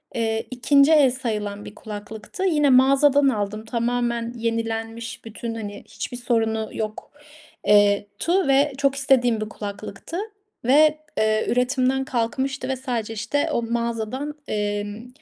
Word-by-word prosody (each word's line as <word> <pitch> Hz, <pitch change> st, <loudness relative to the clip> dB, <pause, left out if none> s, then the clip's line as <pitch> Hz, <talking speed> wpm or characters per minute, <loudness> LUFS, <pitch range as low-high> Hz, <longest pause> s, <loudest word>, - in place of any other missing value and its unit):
eee, 225 Hz, -1 st, -1 dB
2'nci 280 Hz, +4 st, +4 dB
el 290 Hz, -5 st, +6 dB
sayılan 210 Hz, -5 st, -3 dB
bir 210 Hz, -, -10 dB
kulaklıktı. 210 Hz, -, -7 dB
Yine 300 Hz, -6 st, +3 dB
mağazadan 275 Hz, +2 st, +5 dB
aldım, 215 Hz, -2 st, -3 dB
tamamen 235 Hz, 0 st, -1 dB
yenilenmiş 225 Hz, 0 st, -3 dB
bütün, 225 Hz, +1 st, -6 dB
hani, 205 Hz, -2 st, -7 dB
hiçbir 245 Hz, -, -6 dB
sorunu 225 Hz, -2 st, 0 dB
yok 215 Hz, -1 st, -5 dB, 0.6 s
eee, 205 Hz, 0 st, +5 dB
tu 360 Hz, +1 st, +1 dB
ve 275 Hz, +1 st, +3 dB
çok 275 Hz, -1 st, +2 dB
istediğim 250 Hz, -5 st, +2 dB
bir 215 Hz, -, -3 dB
kulaklıktı 205 Hz, -, -7 dB, 0.5 s
ve, 305 Hz, +4 st, +5 dB, 0.2 s
eee, 215 Hz, 0 st, +2 dB
üretimden 255 Hz, +1 st, +1 dB
kalkmıştı 260 Hz, +3 st, -2 dB
ve 265 Hz, -, 0 dB
sadece 245 Hz, -4 st, -3 dB
işte 230 Hz, +7 st, -1 dB
o -, -, +1 dB
mağazadan, 235 Hz, +4 st, -3 dB
emm, 205 Hz, +2 st, -3 dB
235 Hz, 130 wpm, -23 LUFS, 220-265 Hz, 0.6 s, el